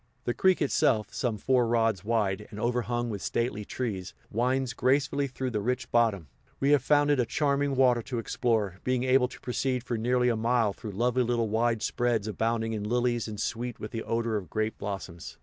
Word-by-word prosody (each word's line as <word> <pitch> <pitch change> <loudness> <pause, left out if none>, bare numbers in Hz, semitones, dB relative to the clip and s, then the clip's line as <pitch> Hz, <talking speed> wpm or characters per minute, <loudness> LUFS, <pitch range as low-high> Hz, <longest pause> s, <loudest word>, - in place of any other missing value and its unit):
The 120 - -1
creek 185 +7 +3
itself, 110 -6 +1
some 120 -4 -1
four 125 +2 +2
rods 115 -5 +1
wide, 105 -2 0
and 105 - -8
overhung 120 0 -1
with 100 -2 -5
stately 115 -3 -1
trees, 100 -5 -4 0.2
winds 125 +2 0
gracefully 140 +3 +1
through 130 0 -4
the 105 -2 -1
rich 125 +4 -2
bottom; 110 -8 +2 0.3
we 140 +1 +2
have 145 -3 +5
found 145 +1 +3
it 145 - +2
a 125 - +3
charming 140 0 +1
water 125 -2 +4
to 125 +1 -5
explore, 110 -4 -1
being 125 -1 0
able 130 0 +4
to - - -12
proceed 125 0 -1
for 120 -2 -3
nearly 125 +2 +2
a 120 - +1
mile 115 -2 +1
through 105 -1 -8
lovely 125 +5 +1
little 120 -2 0
wide 115 0 +1
spreads 120 -3 0
abounding 115 +1 -1
in 105 -2 -3
lilies 120 +1 0
and 105 -2 -6
sweet 120 0 -3
with 105 - -6
the 115 - -3
odor 115 -1 -1
of 95 -4 -6
grape 110 0 -2
blossoms. 95 -4 -6
120 Hz, 200 wpm, -28 LUFS, 110-125 Hz, 0.3 s, have